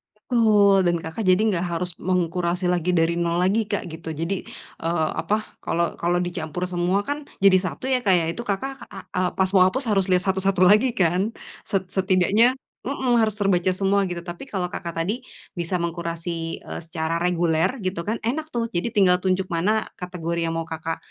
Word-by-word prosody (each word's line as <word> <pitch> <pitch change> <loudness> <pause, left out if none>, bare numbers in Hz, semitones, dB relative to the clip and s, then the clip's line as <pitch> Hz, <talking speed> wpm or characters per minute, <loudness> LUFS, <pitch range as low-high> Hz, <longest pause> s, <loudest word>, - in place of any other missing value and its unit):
Betul, 210 -4 +4
dan 175 0 +3
Kakak 160 +7 -5
jadi 185 +2 +4
enggak 180 -2 0
harus 175 0 -2
mengkurasi 180 0 0
lagi 180 0 +1
dari 165 0 +3
nol 170 0 0
lagi, 205 +5 +2
Kak, 205 - -2
gitu. 160 0 -6
Jadi, 165 +5 -2 0.4
eee, 165 -2 +1
apa, 210 +6 -1 0.2
kalau 170 0 0
kalau 175 +1 +1
dicampur 175 -1 -3
semua 180 +2 +1
kan 290 +1 -3 0.2
jadi 195 -1 +7
satu 185 - -4
ya, 255 -1 +3
Kak, 190 - +5
ya, 170 -2 +3
itu 170 - -4
Kakak 265 +6 -3
ak 195 -1 -10
eee, 180 0 +1
pas 190 -1 +1
mau 185 -2 +7
hapus 260 +8 0
harus 195 -2 +2
lihat 180 0 +2
satu-satu 190 0 +1
lagi 225 +4 +5
kan? 185 +3 +2 0.4
Set 195 -3 -1
setidaknya, 195 +5 +3 0.3
mmm, 265 -2 0
harus 220 -2 +2
terbaca 190 -3 +2
semua 195 0 +2
gitu. 175 -1 -4
Tapi 175 +7 -7
kalau 180 -3 -2
Kakak 170 -2 -5
tadi 210 +9 -2 0.4
bisa 175 +1 -1
mengkurasi, 170 -1 -4
eee, - - -5
secara 160 0 -2
reguler, 175 +4 +1
gitu 185 -2 -2
kan, 220 +2 -1
enak 305 +7 -2
tuh. 235 -1 0
Jadi 200 +1 -2
tinggal 185 -4 +5
tunjuk 185 0 +1
mana 210 +6 +1
kategori 170 -2 -3
yang - - -2
mau 165 - -2
Kakak, 160 0 -4
185 Hz, 190 wpm, -23 LUFS, 170-200 Hz, 0.4 s, jadi